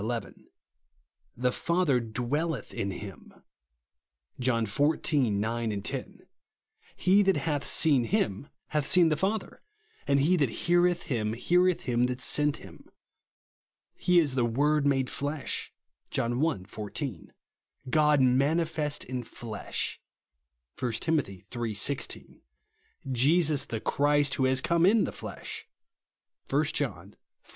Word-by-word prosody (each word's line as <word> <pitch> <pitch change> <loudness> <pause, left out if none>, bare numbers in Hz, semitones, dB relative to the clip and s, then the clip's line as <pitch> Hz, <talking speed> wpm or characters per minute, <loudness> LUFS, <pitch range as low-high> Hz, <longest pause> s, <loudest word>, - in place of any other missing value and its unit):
11); 115 +2 -5 0.9
"the 125 +1 +1
Father 170 -3 +1
dwelleth 125 +7 -3
in 100 - -2
him" 95 +1 -10 1.0
(John 120 -3 +1
xiv. 145 +2 +1
9, 110 0 -1
10); - - -4 0.8
"he 190 +3 +4
that 195 -4 +3
hath 145 -1 -1
seen 140 -7 +3
him 140 - -1 0.2
hath 150 -2 0
seen 175 -3 +5
the 155 - +2
Father 195 +7 -2 0.2
;" 440 0 -33
and 140 0 +3
"he 160 +7 +3
that 140 -6 +2 0.2
heareth 175 0 +3
him, 110 -7 -2
heareth 180 +8 +2
him 125 0 +1
that 125 0 -4
sent 150 +2 +3
him." - - -14 1.0
He 180 0 +1
is 155 -6 +3
"the 130 -2 +1
Word 145 +5 +2
made 135 -2 +2
flesh" 145 +1 -3 0.4
(John 120 +4 -1
i. 160 - 0
14); 105 - -6 0.6
"God 150 -1 +4
manifest 150 +4 +1
in 130 0 -4
flesh" 115 -2 -5 0.8
(1 125 -3 -1
Tim. 160 +7 +1
iii. 95 -9 -8 0.2
IC); 115 +5 0 0.9
"Jesus 150 +4 +3
the 115 - -4
Christ, 145 +3 +1
who 130 - +1
has 130 0 +3
come 170 +3 +1
in 220 +2 +4
the - - -2
flesh" - - -8 0.8
(1 - - +2
John - - -3 0.4
iv. - - -25
140 Hz, 130 wpm, -28 LUFS, 120-160 Hz, 1.0 s, seen